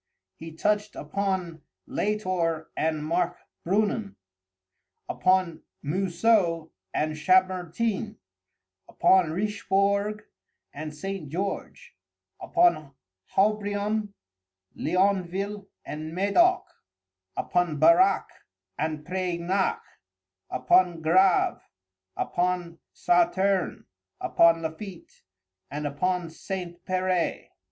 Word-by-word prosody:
He 165 0 -9
touched 210 +5 0
upon 185 -5 -3 0.2
Latour 185 -6 -1
and 155 -1 -1
Markbrünnen; 180 +5 -1 0.9
upon 185 -3 +1 0.2
Mousseux 175 0 +1 0.2
and 155 0 -1
Chambertin; 185 +5 +1 0.7
upon 185 -4 +4
Richbourg 200 +2 0 0.5
and 150 +1 -6
St. 195 -2 -5
George; 200 - -5 0.5
upon 155 - +2 0.4
Haubrion, 205 0 0 0.6
Leonville, 195 +3 0 0.2
and 155 +2 -6
Medoc; 345 - +3 0.7
upon 175 -4 0
Barac 175 +5 +5 0.5
and 155 0 -2
Preignac; 185 +1 -1 0.7
upon 165 +6 +2
Grâve, 185 +3 +3 0.6
upon 175 -1 -1
Sauterne, 335 - +1 0.3
upon 165 0 +4
Lafitte, 170 +3 -8 0.5
and 150 +2 -4
upon 170 +4 -1
St. 175 0 -6
Peray. 185 -1 -1
185 Hz, 75 wpm, -26 LUFS, 165-200 Hz, 0.9 s, Barac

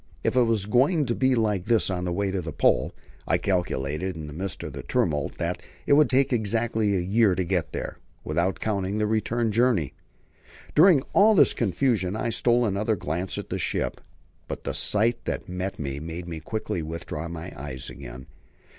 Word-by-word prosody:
If - - 0
it 130 - +5
was 110 -4 +1
going 140 - +3
to 120 - 0
be 130 +1 +2
like 105 -5 0
this 115 -3 +3
on 90 -1 -2
the 90 - -1
way 100 +2 -1
to 95 -1 -1
the 80 -1 -5
Pole, - - +2 0.4
I - - +3
calculated 90 -2 -1
in 80 -2 -6
the 75 - -8
midst 95 +3 -5
of - - -6
the - - -6
tumult 75 -2 -1
that - - -2 0.2
it - - +4
would 150 +1 +5
take 135 0 +3
exactly 110 -1 +1
a - - +1
year 100 +1 +3
to 95 - 0
get 85 -4 -1
there, - - -5 0.2
without 85 +5 0
counting 100 -2 -1
the 105 - +1
return 110 +1 0
journey. 115 - +2 0.8
During 160 -4 +6
all 215 +2 +6
this 170 - +6
confusion 105 -2 0
I 115 +1 -1
stole 120 +2 +2
another 105 +1 0
glance 90 +2 -3
at - - -6
the - - -1
ship, - - -2 0.5
but - - -6
the - - -3
sight 110 +3 +1
that - - -3
met 90 +1 -4
me 70 -1 -4
made 85 +3 -6
me 85 -2 -5
quickly 90 +1 -3
withdraw 80 0 -5
my 85 +1 -7
eyes 65 -2 -6
again. 60 +2 -9
100 Hz, 195 wpm, -26 LUFS, 85-115 Hz, 0.8 s, During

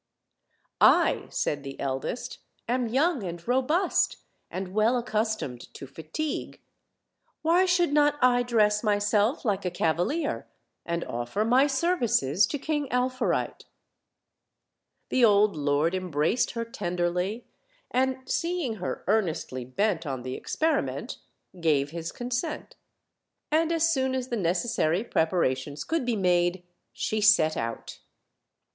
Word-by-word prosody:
"I," - - +4
said 145 - -1
the 135 0 -8
eldest, 135 - -4 0.3
"am 245 0 0
young 275 +4 +1
and 170 0 -6
robust, 265 +9 +1 0.3
and 185 0 -5
well 220 +4 +3
accustomed 220 - -2
.to - - -8
fatigue; 160 - -5 0.8
why 345 +4 +4
should 355 -4 +2
not 295 0 +4
I 245 -1 +4
dress 215 -3 +2
myself 210 +4 +1
like 200 -3 0
a 180 - 0
cavalier, 175 - -1 0.4
and 170 0 -1
offer 120 - -2
my 255 +5 +4
services 245 - +2
to 290 - -3
King 295 0 -2
Alfourite?" 255 +1 -1 1.4
The 255 - +2
old 210 -2 +5
lord 145 +3 +1
embraced 180 - 0
her 230 -1 -3
tenderly, 180 +1 -2 0.5
and, 260 +1 0
seeing 335 -10 -1
her 180 - -4
earnestly 170 - -1
bent 175 - -1
on 130 -3 -4
the 130 0 -4
experiment, 315 - -1 0.4
gave 145 -4 +1
his 165 0 -5
consent; 250 +6 -4 0.8
and 320 +1 +2
as 330 -1 +2
soon 265 -2 0
as 255 -1 -3
the 240 - -1
necessary 180 -1 0
preparations 145 - 0
could 325 -5 -1
be 240 - +1
made 175 -2 +1 0.3
she 215 0 -2
set 205 -7 +5
out. 115 0 -5
215 Hz, 125 wpm, -27 LUFS, 170-260 Hz, 1.4 s, old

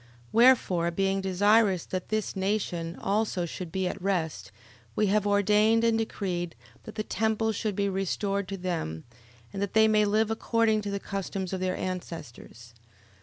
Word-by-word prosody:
11:25. 125 - -25 0.2
Wherefore 225 -8 +4
being 195 +2 0
desirous 195 0 +3
that 185 -1 -5
this 215 -1 -1
nation 190 -4 -2
also 200 -3 -1
should 170 0 -7
be 190 +1 -1
at 195 - -5
rest, 160 - -2 0.4
we 215 - +2
have 210 -1 +2
ordained 210 +3 +3
and 230 -1 +3
decreed, 180 - -3 0.3
that 220 - -9
the 215 - -2
temple 220 +1 0
should 215 -1 -2
be 200 0 0
restored 195 +1 -1
to 195 0 -5
them, 165 - -3 0.5
and 195 - -4
that 200 - -2
they 220 0 +6
may 215 -1 +4
live 215 +2 +2
according 225 -1 +1
to 205 - -4
the 200 0 -2
custom 195 -1 -4
of 185 0 -4
their 185 0 -1
ancestors. 160 -10 -7
195 Hz, 170 wpm, -28 LUFS, 180-215 Hz, 0.5 s, they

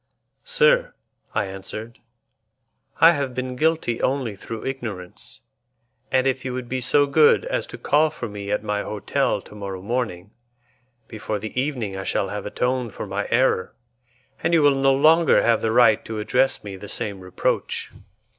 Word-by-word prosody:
"Sir," - - +3 0.4
I - - +1
answered, 100 +4 -7 1.0
"I 165 +2 +8
have 140 -5 -2
been 130 0 -3
guilty 155 -5 0
only 130 -5 -1
through 110 +3 -7
ignorance, 110 -9 -6 0.7
and 130 0 +3
if 130 -1 0
you 130 -1 -4
would 125 -1 -5
be 130 +1 -3
so 145 +3 +4
good 150 - +4
as - - -2
to - - -9
call 155 +2 +3
for 150 -6 -6
me 100 -1 -7
at 105 +1 -1
my 105 -1 -1
hotel 105 -1 -1
to - - -15
morrow 100 -3 -6
morning, 105 -4 -3 0.8
before 110 -1 -4
the 110 +2 -7
evening 125 -7 -2
I 95 - -4
shall 95 - -1
have 105 +1 -5
atoned 125 0 -1
for - - -5
my 100 +1 -3
error, 115 -6 +1 0.7
and 170 - +2
you 160 - +4
will 145 -1 +6
no 135 0 +3
longer 160 +3 +5
have 115 - +3
the 110 - 0
right 115 -2 +5
to 110 - -5
address 135 +5 +1
me 100 -2 -7
the 100 +1 -9
same 100 -2 -2
reproach." 90 0 -2
120 Hz, 170 wpm, -23 LUFS, 105-135 Hz, 1.0 s, I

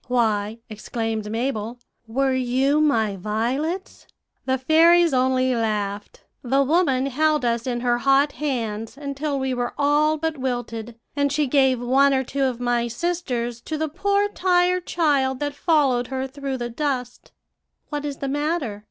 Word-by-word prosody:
"'Why,' 220 -3 0
exclaimed 220 0 -4
Mabel, 230 0 -2 0.3
'were 265 +4 +1
you 260 +4 +1
my 220 -9 +2
violets?' 250 - -3 0.4
"The 260 0 +2
fairies 330 +4 +5
only 255 0 +2
laughed. 210 -3 -3 0.2
"'The 270 +2 +2
woman 275 -3 +2
held 300 +1 +1
us 235 +1 0
in 240 -1 -2
her 240 -1 +1
hot 275 +3 +3
hands 230 -6 -3
until 280 0 -3
we 265 -1 -1
were 245 -1 -3
all 295 +2 +3
but 320 -1 -3
wilted, 240 -3 -4 0.2
and 285 -1 +1
she 295 +1 +1
gave 265 -2 +3
one 270 +3 +3
or 265 - +1
two 275 +2 -1
of 250 -2 -2
my 240 -1 0
sisters 240 -4 -3
to 310 +5 -4
the 315 +1 -1
poor 400 +5 +1
tired 360 -2 +1
child 275 -6 +1
that 290 -1 -2
followed 280 -6 +2
her 265 0 -3
through 270 0 -5
the 240 -1 -4
dust.' 250 -2 -3 0.6
"'What 295 -1 -3
is 285 -2 -4
the 275 - -4
matter?' 290 -6 -2
265 Hz, 155 wpm, -23 LUFS, 240-295 Hz, 0.6 s, fairies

